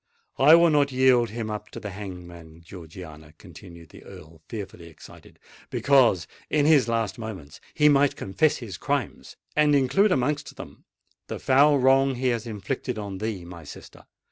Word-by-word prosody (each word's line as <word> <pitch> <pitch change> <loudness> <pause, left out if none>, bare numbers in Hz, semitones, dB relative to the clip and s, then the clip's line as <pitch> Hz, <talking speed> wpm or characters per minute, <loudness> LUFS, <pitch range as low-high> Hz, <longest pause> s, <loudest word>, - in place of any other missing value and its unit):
I 155 - +7
will 170 -1 +4
not 145 -2 +2
yield 125 -2 +3
him 110 0 -5
up 105 0 -7
to - - -9
the 105 - -7
hangman, 85 -4 -10
Georgiana," 80 -3 -12
continued 85 -3 -14
the - - -15
Earl, 80 -4 -14
fearfully 95 -6 -8
excited; 80 -3 -16 0.3
"because 125 -10 +3 0.2
in 150 -1 +1
his 145 -6 +4
last 115 -1 -2
moments 95 -10 -9
he 150 -1 +4
might 145 -1 +3
confess 150 +11 0
his 105 -8 -8
crimes, - - -4 0.2
and 150 -1 +3
include 190 +10 +2
amongst 145 0 -1
them - - -12 0.4
the - - -5
foul 145 +2 +4
wrong 135 +1 +3
he 130 +1 -1
has 120 -1 -3
inflicted 115 +3 -5
on 100 -3 -6
thee, 105 -4 -4
my 85 -1 -11
sister! 75 - -13
110 Hz, 165 wpm, -24 LUFS, 90-135 Hz, 0.4 s, I